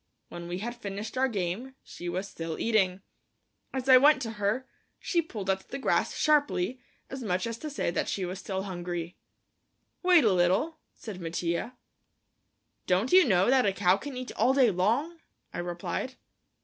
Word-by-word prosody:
When 170 0 -8
we 175 +1 -3
had 235 +5 -4
finished 200 +3 -5
our 260 +1 +3
game, 215 +4 -3
she 175 - -7
was 185 +3 -3
still 165 -4 -5
eating. 195 -4 +1 0.7
As 265 -1 -4
I 260 -1 +9
went 290 +2 +6
to 225 - -4
her, 215 +6 0 0.3
she 345 - 0
pulled 215 - -7
at 190 0 -1
the 275 - -4
grass 270 - +1
sharply, 285 -7 +2 0.3
as 265 0 -5
much 185 -3 -1
as 230 0 -4
to 310 - -5
say 285 -11 -1
that - - -1
she 190 - -2
was 180 +1 -5
still 190 -1 -3
hungry. 175 -2 -5 0.9
"Wait 360 -3 +6
a 215 -4 +4
little," 185 - +1 0.2
said 200 -5 -8
Mattia. 170 +8 -3 1.1
"Don't 190 +7 +2
you 370 0 +8
know 190 +2 +4
that 260 -5 +4
a - - +3
cow 185 -1 +3
can 260 +6 -7
eat 255 0 -5
all 260 +2 +3
day 255 -5 +5
long?" 235 - 0 0.3
I - - -4
replied. 175 +9 -4
205 Hz, 175 wpm, -28 LUFS, 180-260 Hz, 1.1 s, I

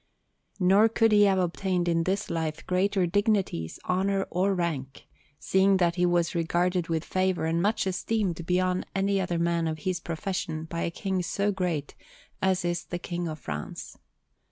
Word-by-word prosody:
Nor 195 +4 +5
could 225 0 +3
he 205 -1 +6
have 195 -1 +3
obtained 180 0 0
in 165 -1 +1
this 195 +2 -1
life 160 -2 -3
greater 185 +1 +1
dignities, 195 - 0
honour, 195 +1 +1
or 190 +2 +1
rank, 145 -7 -3 0.3
seeing 190 +5 +3
that 175 -2 +2
he 180 0 +2
was 175 -1 +1
regarded 175 +1 0
with 165 -1 -1
favour 185 -3 0
and 165 +1 +1
much 205 +3 +1
esteemed 190 -2 -1
beyond 185 0 +1
any 195 0 +1
other 180 -2 -1
man 170 -1 +1
of 160 -1 -2
his 185 -1 0
profession 165 -1 -3
by 170 +1 -4
a - - 0
King 190 +2 -2
so 200 +4 0
great 175 -7 -2 0.5
as 190 -1 +1
is 175 0 -1
the 175 - -4
King 175 0 -4
of 155 -1 -5
France. 75 - -6
180 Hz, 170 wpm, -27 LUFS, 170-195 Hz, 0.5 s, he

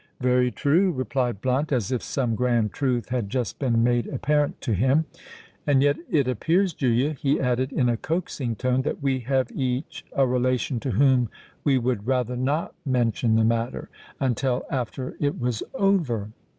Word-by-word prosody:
"Very 125 0 +3
true," 155 - +2
replied 130 - -2
Blunt, 130 +4 0
as 120 -6 0
if 125 - 0
some 125 -5 -1
grand 120 -2 +1
truth 125 -4 -1
had 120 -5 -2
just 125 -1 -2
been 115 -4 +2
made 120 0 +2
apparent 145 +2 0
to 120 - -1
him. 130 - +2 0.6
"And 140 -2 +4
yet 145 0 +4
it 140 -4 +2
appears, 165 - +1
Julia," 130 +1 +1
he 140 0 0
added, 130 +1 0
in 125 - +1
a 120 -1 +1
coaxing 145 -6 -2
tone, 130 +3 +1
"that 140 - -3
we 135 -1 +1
have 130 +1 0
each 130 +2 -3
a 135 - +4
relation 125 0 0
to 130 - -4
whom 125 0 +3 0.3
we 140 -3 +3
would 120 -3 -1
rather 125 -2 0
not 140 +6 -1
mention 120 -4 +1
the 110 0 +4
matter—until 125 +2 -2
after 130 0 -3
it 145 -1 -1
was 120 -3 -1
over." 155 - +1
130 Hz, 165 wpm, -25 LUFS, 120-140 Hz, 0.6 s, And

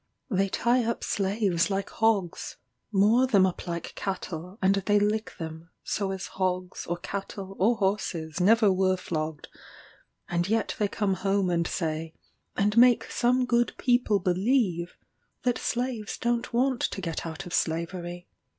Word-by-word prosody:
They 195 0 +2
tie 240 +5 +2
up 230 +1 -2
slaves 195 -3 +1
like 195 0 -2
hogs 215 -6 0 0.3
moor 220 +6 +4
them 200 -6 +5
up 185 0 -3
like 170 -1 -4
cattle, 185 -1 -5
and 190 +1 +4
they 200 +1 +2
lick 215 +2 0
them, 160 0 -7
so 200 -2 -1
as 190 0 -4
hogs, 185 -1 -3
or 175 - -1
cattle, 195 +1 -6
or 225 +5 +4
horses 190 -5 -1
never 210 +1 +5
were 185 0 +2
flogged; 155 -4 -4 0.8
and 175 +2 -1
yet 225 0 0
they 210 - +2
come 200 -1 0
home 195 0 +1
and 170 -1 +1
say, 160 -2 -3 0.4
and 210 +2 +1
make 245 0 +5
some 250 +1 +2
good 240 -1 +2
people 245 -4 +2
believe, 185 -1 +1 0.5
that 245 -2 +1
slaves 240 -3 -2
don't 235 0 -1
want 255 +1 +1
to - - -1
get 165 -4 -3
out 165 +4 -6
of 175 - -8
slavery. 175 +1 -2
195 Hz, 150 wpm, -27 LUFS, 175-220 Hz, 0.8 s, them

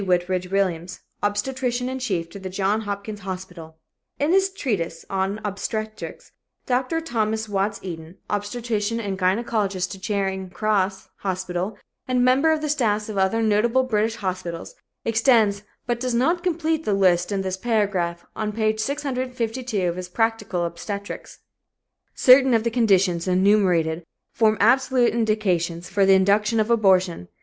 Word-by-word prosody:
Whitridge 180 0 0
Williams, 185 -2 -1 0.2
obstetrician 250 +4 -1
in 260 0 -3
chief 185 -10 -2
to 200 - -8
the 190 -1 -6
Johns 200 +3 0
Hopkins 205 +1 -5
Hospital, 180 -4 -8 0.4
in 290 +3 +1
his 385 +1 +3
treatise 200 - -3
on 195 +2 -1
Obstetrics. 215 +2 -5 0.3
Dr. 255 +6 0
Thomas 220 -6 -1
Watts 200 0 -1
Eden, 170 -1 -8
obstetrician 215 +1 -2
and 200 -4 -3
gynecologist 195 -1 0
to 195 - -7
Charing 190 -1 -2
Cross 195 -1 -1
Hospital 185 +1 -3 0.3
and 250 -1 +2
member 270 +5 +4
of 315 -1 +1
the 305 - -2
staffs 220 -7 0
of 205 -2 -2
other 190 +4 +2
notable 225 +4 +3
British 225 -2 0
hospitals, 185 - -4 0.3
extends 225 -3 +3 0.2
but 240 -1 -1
does 250 -1 -1
not 330 +9 +2
complete 325 -3 0
the 205 - +1
list 180 -1 +3
in 195 -1 -1
this 185 -1 -2
paragraph 190 -5 -1
on 215 -1 -2
page 215 0 0
652 255 -5 -2
of 175 0 -2
his 180 -1 -6
Practical 215 -4 0
Obstetrics: 200 +4 -6 0.8
"Certain 260 -1 +6
of 225 - +2
the 235 - 0
conditions 195 -7 +2
enumerated 180 -4 +2 0.3
form 220 -1 +3
absolute 250 +2 +3
indications 185 -7 0
for 200 -1 +3
the 195 - +7
induction 210 +4 +3
of 215 +2 +1
abortion. 185 - +3
210 Hz, 145 wpm, -23 LUFS, 185-235 Hz, 0.8 s, the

